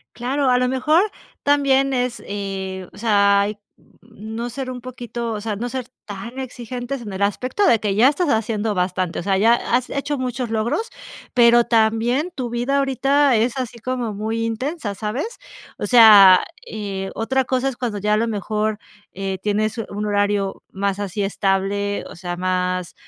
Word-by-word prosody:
Claro, 270 +3 -1
a 250 - +4
lo 250 - +2
mejor 305 +6 +3 0.4
también 275 -1 +3
es 250 -2 -1
eh, 190 -2 -5
o - - -14
sea, 200 -2 +3 0.3
mm, 220 -1 -12
no 235 +1 -4
ser 265 +1 -5
un 250 -1 -5
poquito 240 -2 -6
o 210 - -4
sea, 215 -1 -3
no 240 +4 -4
ser 255 -1 -5 0.2
tan 215 +5 -8
exigentes 250 0 -5
en 215 -3 -7
el 190 +1 -1
aspecto 255 - 0
de 230 - +5
que 205 -2 -1
ya 235 +6 +6
estás 315 +3 0
haciendo 220 -2 0
bastante. 180 -1 -1
O - - -5
sea, 195 0 +1
ya 225 +3 +5
has 245 +1 -1
hecho 280 0 -2
muchos 250 -2 -3
logros, 235 - -1 0.4
pero 240 -1 +6
también 230 +8 +1
tu 250 -4 -4
vida 245 +4 0
ahorita 275 0 +2
es 235 +4 0
así 245 -2 -4
como 245 -2 -3
muy 220 +2 -2
intensa, 230 0 -3
¿sabes? 235 - -4 0.4
O - - -2
sea, 210 -6 +9 0.3
eh, 195 -3 -4
otra 265 +4 0
cosa 260 +1 0
es 265 - -7
cuando 235 -4 -3
ya 210 +1 0
a - - +3
lo 230 +2 +1
mejor, 215 0 -1 0.4
eh, 195 0 -4
tienes 215 +2 -1
un 210 -1 -4
horario 205 -1 0
más 195 0 -2
así 200 0 -3
estable, 195 +1 -1
o - - -11
sea, 175 0 -5
más 180 -1 -1
225 Hz, 175 wpm, -21 LUFS, 205-255 Hz, 0.4 s, sea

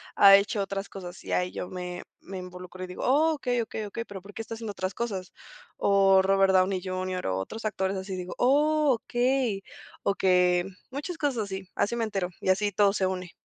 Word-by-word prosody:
ha 195 -1 +9
hecho 200 +1 +2
otras 195 0 -4
cosas, 180 -2 -9
y - - -7
ahí 180 0 +1
yo 180 - -5
me 180 -1 -6 0.2
me 190 0 -7
involucro 180 0 -8
y 185 - -5
digo: 180 - -7
"Oh, 305 +5 +4
okey, 245 -4 0
okey, 220 -1 -4
okey, 230 +3 -5
pero, 195 -2 -8
¿por 200 +2 -13
qué - - -4
está 225 - -7
haciendo 225 -1 -5
otras 185 0 -3
cosas?", 195 -6 -4 0.4
o 195 -1 +5
Robert 195 0 +3
Downey 185 0 +3
Junior, 185 -1 -3
o 95 0 0
otros 220 - -6
actores 190 -2 -1
así 190 0 -5
digo: 180 0 -6
"Oh 295 +3 +3
okey, 245 -3 0 0.4
okey", 180 -2 +3 0.3
muchas 295 +5 -5
cosas 240 -9 -1
y 190 - -2
así, 185 - -19
así 220 - +1
me 235 - -1
entero, 195 -5 -2
y 190 - -1
así 205 +2 +2
todo 200 +1 +3
se 190 -2 +1
une. 185 -1 -4
195 Hz, 210 wpm, -27 LUFS, 185-225 Hz, 0.4 s, ha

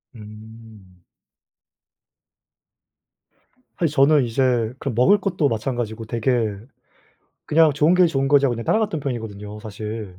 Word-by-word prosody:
음. 110 -3 -14 2.7
사실 165 -5 -1
저는 145 0 +4
이제 120 -1 0
그 140 - -4
먹을 125 - +3
것도 180 -8 0
마찬가지고 115 -1 -4
되게 115 -2 -1 0.9
그냥 155 0 +4
좋은 150 +5 +2
게 180 -1 +5
좋은 135 -4 -1
거지 140 0 +4
하고 125 - 0
그냥 115 0 -6
따라갔던 210 - 0
편이거든요, 105 -6 -6
사실. 105 -2 -7
120 Hz, 255 characters per minute, -21 LUFS, 110-145 Hz, 2.7 s, 게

